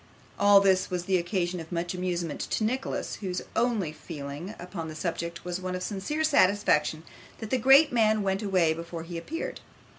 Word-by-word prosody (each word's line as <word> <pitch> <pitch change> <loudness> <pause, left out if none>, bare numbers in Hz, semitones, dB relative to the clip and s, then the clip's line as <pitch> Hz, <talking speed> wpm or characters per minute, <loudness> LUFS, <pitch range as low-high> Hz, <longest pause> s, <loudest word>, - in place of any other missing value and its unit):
All 200 0 +7
this 190 -1 +3
was 180 -1 -3
the 185 -1 +2
occasion 175 0 -1
of 160 -1 -9
much 175 +1 -2
amusement 175 -3 -3
to - - 0
Nicholas, 255 +5 -2
whose 185 -3 -4
only 225 -9 +1
feeling 155 +5 -7
upon 175 -2 -6
the 155 - -7
subject 170 +1 -4
was 180 +1 -3
one 185 0 -3
of 180 - -4
sincere 205 +12 -2
satisfaction 195 - +3 0.3
that 220 -2 -7
the 260 - +2
great 270 +6 +7
man 220 -3 +3
went 195 0 0
away 185 -6 +2
before 165 0 -7
he 170 +1 -8
appeared. 320 - -5
185 Hz, 180 wpm, -28 LUFS, 170-205 Hz, 0.3 s, All